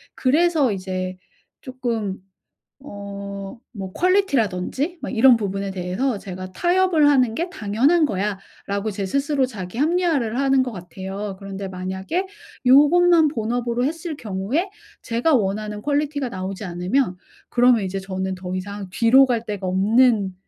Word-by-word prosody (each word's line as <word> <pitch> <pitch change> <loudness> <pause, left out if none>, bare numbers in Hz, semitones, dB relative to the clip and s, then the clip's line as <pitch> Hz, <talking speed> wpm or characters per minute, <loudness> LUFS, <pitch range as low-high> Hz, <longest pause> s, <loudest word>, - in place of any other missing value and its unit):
그래서 300 -1 +2
이제 185 -1 -4 0.4
쪼끔 230 -6 -3 0.6
어 200 -6 -8 0.4
뭐 190 -2 -6
퀄리티라든지 295 - 0
뭐 - - -4
이런 250 +1 +6
부분에 195 -2 -3
대해서 190 +6 -2
제가 185 -1 -8
'타협을 350 - +3
하는 255 -6 +3
게 340 +7 -2
당연한 265 - +2
거야.'라고 200 0 -4
제 200 -1 -4
스스로 275 +4 +1
자기 200 -3 -7
합리화를 305 -7 +1
하는 270 -1 +3
것 255 - -3
같아요. 190 +2 -6
그런데 195 0 -6
만약에 190 - -3 0.4
요것만 320 +5 +6
본업으로 240 -1 -1
했을 320 +2 -3
경우에 225 - -2 0.3
제가 240 +7 +1
원하는 210 -1 -1
퀄리티가 290 -1 -1
나오지 190 0 -5
않으면 180 +4 0 0.3
그러면 245 -2 +4
이제 195 0 -3
저는 190 0 -3
더 185 0 -6
이상 200 +1 -6
뒤로 240 +7 +5
갈 235 -3 -1
데가 205 -4 -4
없는 205 +1 +3
225 Hz, 310 characters per minute, -22 LUFS, 195-275 Hz, 0.6 s, 이런